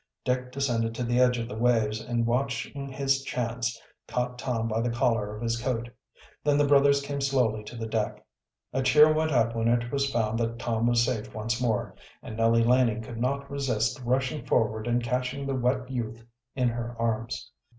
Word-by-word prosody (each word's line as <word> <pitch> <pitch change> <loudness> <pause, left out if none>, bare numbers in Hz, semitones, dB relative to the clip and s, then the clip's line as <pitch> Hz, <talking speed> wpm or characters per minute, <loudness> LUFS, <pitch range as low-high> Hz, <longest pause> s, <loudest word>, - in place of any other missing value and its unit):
Dick 125 0 -1
descended 120 -4 -1
to 125 - -2
the 120 +1 +1
edge 125 -1 +4
of 115 -1 -3
the 110 - -7
waves, 110 -2 +2
and, 120 -1 -1
watching 130 +3 -2
his 135 0 +1
chance, 120 -3 -2 0.3
caught 125 0 -2
Tom 115 -4 -1
by 115 0 0
the 120 - 0
collar 115 -4 0
of 105 - -7
his 115 0 -1
coat. 120 -2 -2 0.5
Then 145 -1 +3
the 145 - +4
brothers 140 0 +4
came 140 0 -3
slowly 125 -6 +1
to 120 - -9
the 115 -1 -4
deck. 110 -1 -2 0.5
A 130 - +1
cheer 150 +4 +6
went 155 0 +1
up 115 -4 +2
when 115 0 0
it 120 0 +1
was 140 -1 0
found 115 -1 0
that 115 0 -1
Tom 115 -1 0
was 120 0 +4
safe 115 -4 -3
once 115 +3 -2
more, 115 -4 0 0.3
and 110 - -7
Nellie 115 +1 +3
Laning 120 -2 +3
could 115 0 -7
not 140 +2 -1
resist 130 -2 -1
rushing 130 +4 0
forward 110 0 0
and 120 0 +1
catching 125 +3 -2
the 135 - -1
wet 125 0 0
youth 115 -3 -5 0.3
in 125 -2 +2
her 120 0 -4
arms. 115 +3 -2
120 Hz, 195 wpm, -27 LUFS, 115-130 Hz, 0.5 s, cheer